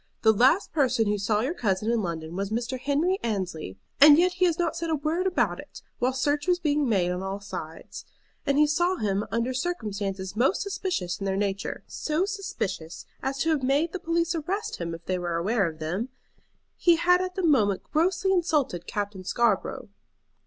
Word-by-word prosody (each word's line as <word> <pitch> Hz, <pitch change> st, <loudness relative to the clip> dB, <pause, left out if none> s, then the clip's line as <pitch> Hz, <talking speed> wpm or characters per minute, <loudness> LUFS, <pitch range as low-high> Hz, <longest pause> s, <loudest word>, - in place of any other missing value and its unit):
The 220 Hz, -1 st, +6 dB
last 260 Hz, -, +3 dB
person 255 Hz, -7 st, +2 dB
who 205 Hz, 0 st, 0 dB
saw 210 Hz, +1 st, +1 dB
your 265 Hz, +8 st, -1 dB
cousin 215 Hz, -, 0 dB
in 235 Hz, -2 st, +1 dB
London 165 Hz, -2 st, -4 dB
was 195 Hz, +1 st, -2 dB
Mr. 240 Hz, +4 st, -2 dB
Henry 305 Hz, +8 st, +1 dB
Annesley, 180 Hz, -, -3 dB, 0.2 s
and 290 Hz, +1 st, +9 dB
yet 360 Hz, +2 st, +4 dB
he 365 Hz, 0 st, +1 dB
has 340 Hz, -2 st, +1 dB
not 345 Hz, -2 st, 0 dB
said 335 Hz, -1 st, -3 dB
a 320 Hz, -, +2 dB
word 320 Hz, +5 st, -1 dB
about 370 Hz, -, +1 dB
it, -, -, -11 dB, 0.2 s
while 250 Hz, +2 st, +2 dB
search 290 Hz, +4 st, 0 dB
was 360 Hz, -1 st, +4 dB
being 300 Hz, -5 st, +1 dB
made 180 Hz, -5 st, +2 dB
on 180 Hz, +1 st, -3 dB
all 195 Hz, +1 st, -4 dB
sides. 165 Hz, -5 st, -8 dB, 0.4 s
And 280 Hz, 0 st, +1 dB
he 300 Hz, -, +6 dB
saw 345 Hz, +5 st, +1 dB
him 205 Hz, -, -1 dB
under 235 Hz, +3 st, -1 dB
circumstances 205 Hz, -, -3 dB
most 265 Hz, -, +2 dB
suspicious 365 Hz, -, -3 dB
in 195 Hz, -, -3 dB
their 190 Hz, 0 st, 0 dB
nature; 200 Hz, 0 st, -2 dB
so 315 Hz, +4 st, -1 dB
suspicious 290 Hz, -, -4 dB, 0.2 s
as 270 Hz, 0 st, -2 dB
to 325 Hz, -, +2 dB
have 305 Hz, -3 st, +1 dB
made 280 Hz, +6 st, +1 dB
the 375 Hz, -, -3 dB
police 335 Hz, 0 st, 0 dB
arrest 385 Hz, +7 st, -3 dB
him 170 Hz, -1 st, -4 dB
if 165 Hz, 0 st, -13 dB
they 185 Hz, -1 st, -1 dB
were 175 Hz, -1 st, -2 dB
aware 195 Hz, +3 st, +1 dB
of 160 Hz, -1 st, -6 dB
them. 175 Hz, +10 st, -3 dB, 0.7 s
He 345 Hz, -2 st, +5 dB
had 360 Hz, +2 st, +4 dB
at 370 Hz, 0 st, -4 dB
that 375 Hz, -2 st, 0 dB
moment 210 Hz, -, +3 dB
grossly 360 Hz, +4 st, +1 dB
insulted 310 Hz, -, 0 dB
Captain 205 Hz, -2 st, -4 dB
Scarborough." 215 Hz, +1 st, 0 dB
255 Hz, 195 wpm, -26 LUFS, -, 0.7 s, and